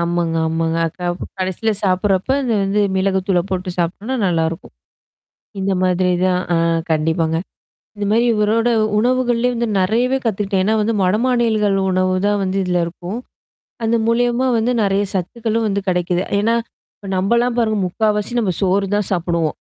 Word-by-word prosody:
ஆமாங்க, 170 -1 0
ஆமாங்க. 165 0 -1
அ - - -1
க - - -20 0.4
கடைசியில 190 +4 -1
சாப்படுறப்ப 190 +3 +1
அந்த 240 -4 0
வந்து 200 +2 +1 0.2
மிளகு 190 0 +1
தூள 185 -3 +2
போட்டு 185 0 -2
சாப்பி்டோம்னா, 195 +9 -2
நல்லாருக்கும். 165 -2 -1 0.9
இந்த 195 +1 0
மாதிரி 185 0 +2 0.2
தான் 180 -1 +1
ஆ - - +2 0.3
கண்டிப்பாங்க. 160 +1 +1 0.6
இந்த 205 0 -3
மாரி 230 +3 +3
இவரோட 220 +2 +2 0.3
உணவுகள்லயே 245 +1 +1
வந்து 235 0 -1
நெறையவே 235 +8 +1
கத்துக்கிட்டேன். 200 -3 0
ஏன்னா 215 +3 +2
வந்து 220 +2 0
வடமாநிலங்கள் 215 0 +2
உணவு 185 0 +1
தான் 205 0 +1
வந்து 190 0 -2
இதில 180 -1 0
இருக்கும். 175 +5 -6 0.7
அது 225 +1 +2
மூலியமா 240 +2 +2
வந்து 230 +3 +1
நெறைய 200 0 +1
சத்துக்களும் 225 +4 -1
வந்து 200 0 0
கிடைக்குது. 180 0 0 0.2
ஏன்னா, 225 +3 +2 0.4
இப்ப 200 - -11
நம்மலாம் 235 +6 +1
பாருங்க 220 -2 +1
முக்காவாசி 210 +4 -1
நம்ம 190 -6 0
சோறு 195 +1 +1
தான் 205 -2 -1
சாப்படுவோம். 170 -3 0
195 Hz, 150 wpm, -19 LUFS, 180-225 Hz, 0.9 s, மாரி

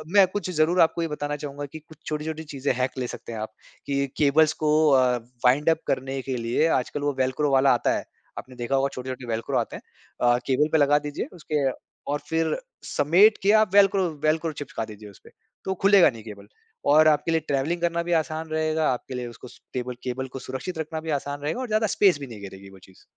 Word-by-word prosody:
मैं 200 -1 +8
कुछ 200 -3 -3
ज़रूर 165 +2 +2
आपको 165 +1 +3
ये 165 - 0
बताना 145 -1 -3
चाहूँगा 145 0 -6
कि 150 +3 -10
कुछ 160 +1 -18
छोटी-छोटी 155 +1 -4
चीज़ें 140 +1 0
हैक 130 +1 -2
ले 125 -1 -2
सकते 120 - -8
हैं 110 - -5
आप, 110 - -4 0.4
कि 140 0 0
केबल्स 155 +1 +4
को 150 0 +3 0.2
अ, 130 -3 +4 0.3
वाइंड 140 +6 +4
अप 160 - +3
करने 135 +1 -2
के 130 0 -4
लिए 120 +7 +1
आजकल 145 +4 -6
वो 145 0 0
वेल्क्रो 130 +3 +1
वाला 135 0 +5
आता 120 - +1
है। - - -5 0.3
आपने 130 - -9
देखा 125 +2 -2
होगा 135 0 +2
छोटे-छोटे 130 0 -6
वेल्क्रो 115 0 -2
आते - - -2
हैं। - - -8 0.4
अ, 120 0 +4
केबल 140 +3 +2
पे 160 - +4
लगा 145 0 +4
दीजिए 145 0 -4
उसके 150 -4 -2 0.5
और 145 - 0
फिर 160 0 +1 0.3
समेट 180 +9 +4
के 200 - +5
आप 215 -3 +1
वेल्क्रो 195 -2 +4
वेल्क्रो 160 +1 +1
चिपका 140 -6 -5
दीजिए 105 -1 -11
उसपे। 100 - -17 0.4
तो 190 - 0
खुलेगा 195 -2 +6
नहीं 115 -4 -10
केबल, 100 -2 -11 0.4
और 155 +2 +6
आपके 150 +1 +2
लिए 165 - +3
ट्रैवलिंग 145 +5 -1
करना 170 0 0
भी 175 - -4
आसान 160 +1 -6
रहेगा। 155 0 0
आपके 125 +1 -7
लिए 125 -1 -4
उसको 120 +1 -11
स - - -16
टेबल 125 0 -3
केबल 130 +1 -3
को - - -6
सुरक्षित 130 +8 -6
रखना 160 0 -4
भी 160 - -7
आसान 145 0 -6
रहेगा 155 - -2
और 255 - -4
ज़्यादा 215 0 +1
स्पेस 190 -7 +4
भी 140 - -7
नहीं 110 -4 -10
घेरेगी 100 0 -10
वो 95 0 -15
चीज़। 95 0 -20
145 Hz, 225 wpm, -25 LUFS, 130-160 Hz, 0.5 s, मैं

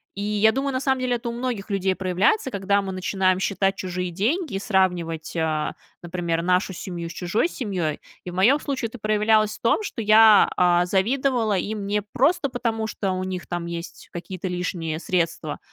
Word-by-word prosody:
И 200 - -5
я 210 +1 +3
думаю, 270 +2 -2
на 255 - -1
самом 265 -1 +1
деле, 250 -1 0
это 235 0 -4
у - - -3
многих 235 -4 -4
людей 190 -1 0
проявляется, 190 - +1
когда 200 +1 +1
мы 190 -1 -5
начинаем 185 0 +1
считать 195 0 0
чужие 180 -1 -3
деньги, 230 - -1
сравнивать, 180 -5 0
о, 155 -1 0 0.3
например, 170 -1 -2
нашу 185 +2 +1
семью 170 -1 -6
с - - -8
чужой 185 - 0
семьей. 185 - -3 0.2
И 180 - -5
в - - -10
моем 235 +11 +4
случае 270 -6 -3
это 245 - -10
проявлялось 215 0 +2
в - - -30
том, 235 - +2
что 250 - -4
я, 215 0 +7
а, 175 0 +4
завидовала 225 +2 +1
им 205 +2 -3
не 205 +1 0
просто 280 - +1
потому, 225 -3 -2
что 195 -3 -2
у 185 0 -2
них 185 -1 -5
там 175 -1 -3
есть 170 0 -7
какие-то 180 +2 -6
лишние 170 -3 -3
средства. 170 -4 -1
195 Hz, 185 wpm, -24 LUFS, 180-225 Hz, 0.3 s, я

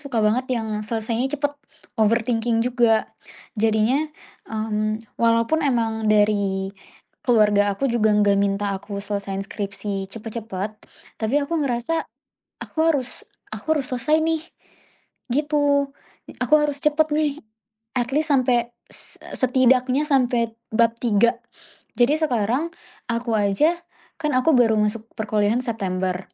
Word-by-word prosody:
suka 245 -7 -1
banget 250 +5 +1
yang 215 -2 -3
selesainya 225 +3 -2
cepet, 290 0 -1 0.5
overthinking 230 +1 +2
juga. 240 -3 +3 0.5
Jadinya, 225 +6 +1 0.4
mmm, 215 0 -2 0.2
walaupun 230 +7 +3
emang 225 -6 0
dari 200 -2 +2 0.5
keluarga 205 -4 +3
aku 275 - -2
juga 215 -3 +2
nggak 205 -1 +4
minta 200 0 0
aku 200 +1 -6
selesaiin 200 -1 -3
skripsi 195 -1 -4
cepet-cepet, 215 -2 -5 0.5
tapi 225 +5 0
aku 285 - -5
ngerasa, 270 +4 -1 0.5
"Aku - - -10 0.2
harus 260 -4 -4 0.2
aku 315 -1 -1
harus 260 - -5
selesai 300 +5 +1
nih," 320 0 0 0.9
gitu. 285 0 +2 0.5
Aku 305 - +3
harus 295 -1 0
cepet 300 +1 +2
nih. 300 -1 0 0.6
At 245 +1 0
least 310 +2 +1
sampai, 245 -3 +2 0.2
s - - -12
e - - -11
setidaknya 255 +2 +3
sampai 245 -4 +2 0.2
bab 230 0 +4
3. 235 +1 +2 0.6
Jadi 250 +5 +4
sekarang 255 +2 0 0.4
aku 235 0 -2
aja 250 - +2 0.4
kan 300 -2 0
aku 285 +5 +3
baru 225 -3 +4
masuk 215 +1 -1
perkuliahan 215 +2 +1
September, 185 -5 -2
230 Hz, 125 wpm, -22 LUFS, 210-270 Hz, 0.9 s, nggak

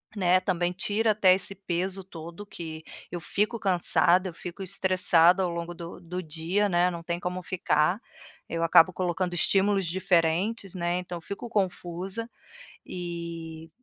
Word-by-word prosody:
né. 185 -2 +4
Também 180 -1 0
tira 215 +4 +1
até 195 -3 +5
esse 195 +1 -4
peso 190 0 -2
todo 170 +2 -9
que 160 -4 -7 0.3
eu 175 - -4
fico 210 +7 -1
cansada, 185 -1 +3
eu - - -10
fico 175 +3 -7
estressada 185 -1 +3
ao 180 - 0
longo 170 0 -4
do 170 0 -9
do 180 +2 -5
dia, 170 +5 0
né, 175 -1 +3
não 170 -2 -6
tem 170 +1 -3
como 180 +1 -4
ficar, 180 +1 +1 0.5
eu 165 0 -1
acabo 165 +2 +6
colocando 180 0 -1
estímulos 195 +2 +3
diferentes, 185 +3 +1
né, 175 0 0
então 180 -1 -5
fico 200 +7 -6
confusa, 190 +1 -2 0.6
e, 170 -2 -6
180 Hz, 150 wpm, -27 LUFS, 170-190 Hz, 0.6 s, acabo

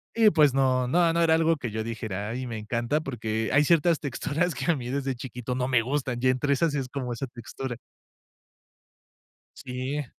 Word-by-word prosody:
y 225 -2 +6
pues 150 -6 +4
no, 130 -2 +2
no, 170 +4 +3
no 170 - +2
era 160 -1 +5
algo 165 -1 +2
que 120 - -4
yo 110 0 -2
dijera: 110 -3 -4
"Ay, 125 +2 -4
me 115 -2 -4
encanta", 120 +7 -1
porque 110 -5 -2
hay 145 +1 +5
ciertas 170 0 +3
texturas 155 +4 -1
que 140 +4 +1
a - - +1
mí 125 -3 -5
desde 135 -1 -2
chiquito 125 0 -5
no 125 0 -1
me 125 -3 +3
gustan, 130 -1 -2
y 130 - +3
entre 135 +3 +2
esas 160 +1 +1
es 135 -3 -2
como 130 -2 -4
esa 135 +3 -4
textura. 120 +1 -7 1.8
Sí. 130 +3 -4
130 Hz, 195 wpm, -27 LUFS, 120-150 Hz, 1.8 s, y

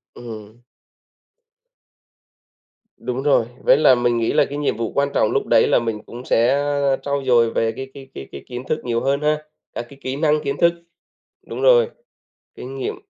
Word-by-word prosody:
Ừm. 110 -1 -10 2.4
Đúng 125 +2 -4
rồi, 140 -6 +3 0.2
với - - +5
là 145 -4 +6
mình 120 -1 +1
nghĩ 115 -1 0
là - - +4
cái 145 - -6
nhiệm 145 -6 -1
vụ 115 -1 -3
quan 140 0 +1
trọng 110 - +2
lúc - - 0
đấy - - +4
là - - +4
mình 115 -2 -3
cũng 120 +2 -10
sẽ, 120 +3 +3 0.4
a, - - +3
trau 140 -1 -2
dồi 120 -3 +4
về 115 0 +1
cái 135 +3 -8
cái 135 -1 -11
cái 70 - -8
cái 70 - -9
kiến 125 0 -6
thức 155 - 0
nhiều 120 -1 -1
hơn 140 +2 0
ha, 150 0 0 0.3
các 120 - -5
cái 140 -1 -15
kỹ 130 +1 -4
năng, 150 +1 +1
kiến 140 0 -2
thức 170 0 +5 0.7
đúng - - -6
rồi, 485 -1 +5 0.7
kinh 130 +2 -8
nghiệm. 130 - -3
130 Hz, 190 wpm, -21 LUFS, 115-140 Hz, 2.4 s, là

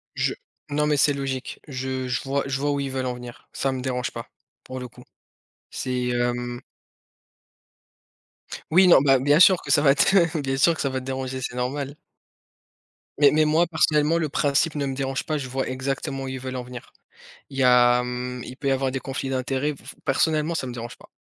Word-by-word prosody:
Je - - 0 0.4
non 150 +1 +1
mais 150 -1 +2
c'est 145 +1 +4
logique. 135 -2 -4
Je 130 -1 -4
je 125 -1 -1
vois 140 +1 -1
je 135 0 -2
vois 145 +1 0
où 140 - -1
ils 140 -1 -2
veulent 130 -1 -2
en 125 - -1
venir, 125 -1 -11
ça 135 - -1
me 130 -1 -4
dérange 125 -1 -2
pas 115 +1 -8 0.3
pour 130 0 -7
le 125 - -6
coup, - - -16 0.7
c'est 125 -1 -2
hem 120 0 -2 2.1
Oui, 185 +3 +6
non, 170 - +8
bah, 135 -1 +5
bien 145 +4 +3
sûr 185 0 +7
que 140 - -4
ça 145 - +5
va 140 -2 +5
te 170 +2 +3
bien 135 -1 -2
sûr 165 +5 +4
que - - -5
ça 140 - 0
va 130 0 -2
te 130 - -11
déranger, 130 0 -4
c'est 125 - -4
normal. 135 +3 -3 1.2
Mais 145 -2 +7
mais 155 0 +3
moi, 155 +3 +3
personnellement, 155 -1 +2
le 155 -2 -1
principe 145 +3 +1
ne 145 -1 -1
me 135 - -2
dérange 135 0 -2
pas, 155 -1 -2
je 130 -2 -6
vois 130 +1 -2
exactement 135 +1 -3
où - - -5
ils 130 0 -5
veulent 130 0 -6
en 125 - -3
venir. 125 -1 -11 0.6
Il 135 - -11
y - - +3
a, 125 -1 +5
hem 125 0 -4
il 130 - -9
peut 140 - -2
y - - +3
avoir 135 0 0
des 135 0 -3
conflits 135 +1 -4
d'intérêts 135 +3 -1
f - - -18
f - - -9
personnellement, 155 +3 +1
ça 135 - -2
me 125 - -5
dérange 120 0 -7
pas. - - -17
135 Hz, 220 wpm, -24 LUFS, 125-145 Hz, 2.1 s, non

